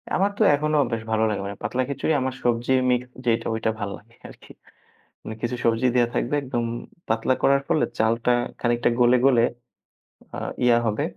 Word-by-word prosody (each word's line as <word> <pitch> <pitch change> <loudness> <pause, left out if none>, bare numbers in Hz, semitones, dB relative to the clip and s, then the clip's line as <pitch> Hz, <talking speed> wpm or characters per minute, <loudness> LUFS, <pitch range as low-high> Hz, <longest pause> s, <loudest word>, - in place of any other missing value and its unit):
আমার 195 +2 +2
তো - - -3
এখনো 150 +1 0
বেশ 115 -1 -2
ভালো 110 0 +2
লাগে। 105 - -2
মানে 100 - -6
পাতলা 120 +5 -1
খিচুড়ি 140 +3 -1
আমার 130 0 -2
সবজি 120 +1 +1 0.2
মিক্স 125 0 -1 0.2
যেইটা 115 -1 +1
ঐটা 110 0 0
ভাল 100 -1 -3
লাগে 115 +3 -22
আরকি। - - -16 0.7
মানে 110 - -7
কিছু 120 +1 -2
সবজি 115 +2 +2
দেয়া 120 -2 +3
থাকবে 125 - -1
একদম 120 -3 -2 0.4
পাতলা 110 +3 +1
করার 140 0 +4
ফলে 155 - +2
চালটা 115 +2 +1 0.3
খানিকটা 120 0 +1
গলে, 120 +1 +5
গলে 125 -4 +4 0.9
আ - - -5 0.3
ইয়া 120 -1 +5
হবে 110 -1 0
120 Hz, 175 wpm, -24 LUFS, 115-130 Hz, 0.9 s, গলে